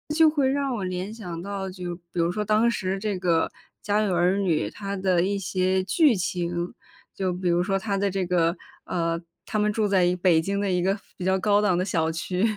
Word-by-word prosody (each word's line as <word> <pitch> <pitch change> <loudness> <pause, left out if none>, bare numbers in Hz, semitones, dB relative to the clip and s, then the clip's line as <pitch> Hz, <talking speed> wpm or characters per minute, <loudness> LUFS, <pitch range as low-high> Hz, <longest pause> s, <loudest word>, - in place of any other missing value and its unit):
就 320 -1 +6
会 285 -4 +1
让 275 -1 0
我 210 - -3
联 185 +3 -4
想 175 -7 -6
到， 195 0 -4
就 180 -2 -5
比 175 - -18
如 170 0 +1
说 210 +2 -2
当 215 +3 +3
时 190 -3 -2
这 200 -1 -2
个 170 -3 +2 0.4
《家 205 +1 +1
有 195 -4 +1
儿 180 +3 +3
女》， 170 - +1
它 200 -1 -4
的 185 -2 +2
一 200 +2 0
些 185 0 0
剧 285 - +4
情。 175 0 -2 0.4
就 185 -2 -1
比 180 0 -1
如 175 +1 +2
说 195 0 0
它 200 -1 -2
的 200 0 0
这 190 0 -1
个， 170 -1 +2 0.3
呃 170 -1 -1 0.3
他 215 - -2
们 210 0 +2
住 215 -1 +1
在 190 -2 +3
一 180 +1 +2
北 175 -2 +3
京 200 +4 -1
的 200 -2 0
一 180 -1 +1
个 195 +2 +2 0.2
比 180 - -5
较 190 0 +3
高 205 +1 +3
档 200 -4 +2
的 180 - +1
小 165 -4 0
区， 180 +4 -2
190 Hz, 245 characters per minute, -25 LUFS, 175-205 Hz, 0.4 s, 就